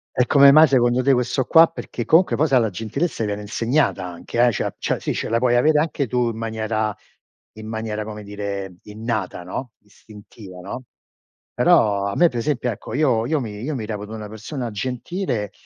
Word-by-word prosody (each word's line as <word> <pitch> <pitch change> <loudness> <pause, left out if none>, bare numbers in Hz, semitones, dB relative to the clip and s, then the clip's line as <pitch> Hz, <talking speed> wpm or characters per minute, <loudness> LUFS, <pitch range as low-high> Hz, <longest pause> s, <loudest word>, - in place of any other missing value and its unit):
E 125 - +3
come 140 +2 +7
mai 155 +2 +7
secondo 125 -1 +2
te 135 0 +4
questo 125 +1 0
qua? 165 0 +7
Perché 125 -7 -6
comunque 165 - +4
poi, 155 - +2
sai, 135 -3 +4
la 115 -2 +1
gentilezza 115 - -3
viene 105 0 -3
insegnata 115 0 0
anche, 90 +7 -2
eh, 120 - +4
cioè- - - -3
cioè - - -1
sì, - - -2
ce - - -3
la 115 - +2
puoi 120 0 +2
avere 150 +5 +4
anche 150 -3 -1
tu 120 0 0
in 115 - -5
maniera 110 -1 -2 0.6
in 110 0 -10
maniera, 110 -1 -4
come 105 0 -8
dire, 100 -2 -5
innata, 110 -4 -4
no, 115 +7 -6
istintiva, 105 -2 -14
no; 125 +7 -7 0.7
però 100 -2 +3
a 100 - -3
me 175 - +5
per 120 - -4
esempio, 125 -1 -1
ecco, 105 - -8
io 130 -6 +2
io 155 0 +1
mi 105 -4 -6
io 145 +4 -3
mi 110 -4 -4
reputo 105 0 -6
una 105 -1 -6
persona 115 +4 -6
gentile, 125 - -3
115 Hz, 195 wpm, -21 LUFS, 105-130 Hz, 0.7 s, come